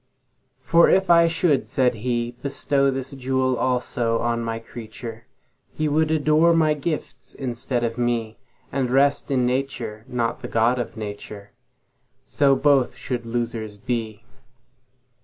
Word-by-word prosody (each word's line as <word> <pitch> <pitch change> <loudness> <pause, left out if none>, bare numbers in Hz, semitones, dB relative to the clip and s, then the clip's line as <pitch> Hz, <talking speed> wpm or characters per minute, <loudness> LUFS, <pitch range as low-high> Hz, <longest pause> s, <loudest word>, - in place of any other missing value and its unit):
For 170 0 +5
if 190 -1 +3
I 170 0 +6
should 165 -3 +1
(said 125 -2 +2
He)Bestow 125 +4 -1
this 135 0 -4
jewel 130 -1 0
also 120 -2 0
on 115 0 -1
My 115 0 -3
creature, 115 0 -9 0.5
He 155 - 0
would 155 +1 +2
adore 155 +2 +3
My 155 -2 +3
gifts 150 -3 -5
instead 120 -1 -3
of 115 +1 -2
Me, 115 -2 -1 0.3
And 130 -3 -1
rest 140 +3 +2
in 130 -3 +2
Nature, 125 -4 -2
not 120 -2 -2
the - - -5
God 115 +2 +2
of 120 - -5
Nature:So 125 +6 -4
both 135 -4 +3
should 120 -1 -5
losers 115 -3 -3
be. 115 -1 -4
125 Hz, 130 wpm, -23 LUFS, 115-140 Hz, 0.5 s, I